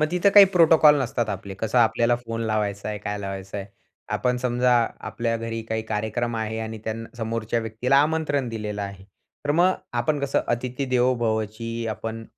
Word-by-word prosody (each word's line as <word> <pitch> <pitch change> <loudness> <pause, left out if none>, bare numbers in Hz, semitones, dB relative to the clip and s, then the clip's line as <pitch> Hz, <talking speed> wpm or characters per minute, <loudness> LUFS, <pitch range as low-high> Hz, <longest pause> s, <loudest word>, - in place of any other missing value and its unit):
मग 155 - +3
तिथं 180 +3 +3
काही 200 -1 +11
प्रोटोकॉल 160 -4 +6
नसतात 120 -2 -2
आपले, 100 -1 -5
कसं 110 +5 0
आपल्याला 120 +1 +3
फोन 115 -1 -6
लावायचा 105 -1 -1
आहे, 105 -1 -3
काय 105 0 -4
लावायचं 95 0 -6
आहे. 100 - -6 0.5
आपण 125 -1 0
समजा 125 0 +1 0.4
आपल्या 115 -1 -1
घरी 115 0 -4
काही 110 0 -3
कार्यक्रम 110 +2 -2
आहे 110 0 -3
आणि 110 0 -5
त्यां 115 +1 -4
समोरच्या 115 0 -2
व्यक्तीला 115 +4 0
आमंत्रण 150 -4 0
दिलेलं 105 -2 -4
आहे, 100 -1 -7 0.4
तर 145 - 0
मग 175 +5 +4 0.3
आपण 145 +4 0
कसं 140 -1 +1
अतिथी 125 +3 -4
देवो 125 +1 +3
भवची 115 0 -2
आपण 110 +1 -5
115 Hz, 175 wpm, -24 LUFS, 110-125 Hz, 0.5 s, काही